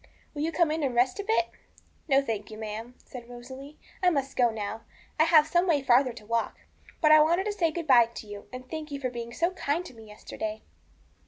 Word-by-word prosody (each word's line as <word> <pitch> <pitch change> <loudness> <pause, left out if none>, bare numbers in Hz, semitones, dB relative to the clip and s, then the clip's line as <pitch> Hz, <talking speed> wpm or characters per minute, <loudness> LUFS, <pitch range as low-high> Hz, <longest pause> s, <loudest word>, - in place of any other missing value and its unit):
'Will 290 - -5
you 320 +2 0
come 330 -1 +2
in 315 +1 -1
and 265 -4 -1
rest 250 +7 +2
a - - -2
bit?' 410 -4 +2 0.6
'No, 275 -2 +4
thank 215 -5 -4
you, 215 - -9
ma'am,' 220 +3 -6
said 245 -2 -10
Rosalie; 260 +4 -10 0.2
'I 365 - +5
must 275 -5 -2
go 245 -2 +4
now; 220 0 -5 0.4
I 315 - +6
have 315 -2 +6
some 345 +3 +1
way 295 -5 +2
farther 255 0 +4
to 225 -2 -12
walk; 230 +1 -2 0.4
but 305 - +5
I 310 0 +8
wanted 340 +5 +2
to 420 - -1
say 345 -5 +1
good 335 +1 -5
bye 240 -5 +6
to - - -7
you, 205 -1 -10
and 255 0 -7
to 255 - -27
thank 315 -1 -5
you 285 -1 -5
for 255 -2 -3
being 235 -1 -6
so 335 +8 0
kind 345 -1 -2
to 305 - -10
me 225 -2 -14
yesterday.' 215 +1 -6
270 Hz, 240 wpm, -27 LUFS, 235-315 Hz, 0.6 s, I